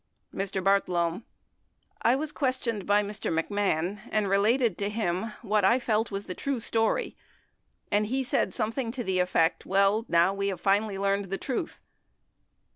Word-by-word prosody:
Mr. 195 -1 -2
Bartlome. 180 -1 +1 0.8
I 235 +2 +4
was 300 +2 -3
questioned 255 -6 -2
by 205 +1 +4
Mr. 205 -2 -3
McMahon 185 +2 0
and 215 -2 +1
re 195 +1 +3
lated 230 0 +2
to 200 0 -1
him 210 0 -2
what 210 -1 +1
I 215 +6 +5
felt 225 -3 0
was 200 0 -5
the 180 - -5
true 275 +5 -2
story, 225 - 0 0.8
and 210 +1 +2
he 265 +4 -1
said 250 - 0
some 220 -2 -2
thing 235 -1 -3
to 250 -2 -4
the 190 -3 0
effect, 170 -2 +2
"Well, 200 +4 +2
now 170 +3 +4
we 200 0 -2
have 195 -2 -2
finally 200 +1 +1
learned 200 0 0
the 195 +1 -3
truth." 270 - -4
205 Hz, 170 wpm, -28 LUFS, 195-230 Hz, 0.8 s, I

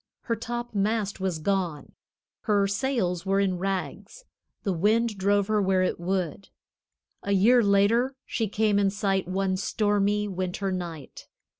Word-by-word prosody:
Her 230 - -1
topmast 225 -3 -2
was 190 -3 -1
gone; 175 -2 -2 0.5
her 205 -3 +3
sails 195 -5 -1
were 195 0 +1
in 190 -3 0
rags; 195 - -4 0.4
the 195 - 0
wind 215 +5 +2
drove 200 +1 +2
her 215 0 +1
where 190 -1 +2
it 185 - -1
would. 185 0 -3 0.7
A 200 - -1
year 230 +6 +5
later 220 +6 +3
she 225 - -2
came 210 0 +1
in 200 -1 +3
sight 195 -2 -1
one 190 0 0
stormy 205 0 +1
winter 190 0 -3
night. 170 -6 -6
200 Hz, 140 wpm, -26 LUFS, 185-210 Hz, 0.7 s, year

